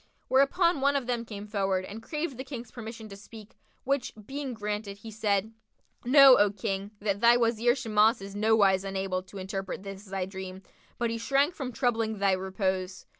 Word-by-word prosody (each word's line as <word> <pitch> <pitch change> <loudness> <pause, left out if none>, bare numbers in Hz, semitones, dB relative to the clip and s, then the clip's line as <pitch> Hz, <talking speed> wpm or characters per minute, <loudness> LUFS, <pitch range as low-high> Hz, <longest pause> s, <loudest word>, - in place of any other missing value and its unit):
Whereupon 280 +4 +3
one 280 +1 +3
of 275 -3 0
them 240 -1 -2
came 210 -2 -7
forward 195 -3 -1
and 210 +4 -8
craved 300 +2 -4
the - - -3
King's 245 -4 -8
permission 225 -1 -8
to 200 - -9
speak, 215 +1 -13 0.3
which 270 -2 -1
being 270 0 -5
granted, 210 -1 -4
he 220 +2 -10
said, 210 0 0 0.5
"Know, 270 0 +8
O 205 0 +5
King, 195 0 -3
that 200 -1 -1
thy 235 +1 +6
Wazir 235 +1 +2
Shimas 225 -2 +3
is 195 +1 -9
nowise 205 -3 +3
unable 190 -1 -2
to 190 +2 -13
interpret 195 0 -5
this 195 0 -8
thy 190 -1 -3
dream; 190 0 -8 0.3
but 235 -1 -1
he 230 - -3
shrank 275 +7 +2
from 265 -5 -5
troubling 225 -3 0
thy 200 0 +2
repose. 190 -1 -2
215 Hz, 180 wpm, -28 LUFS, 195-245 Hz, 0.5 s, Know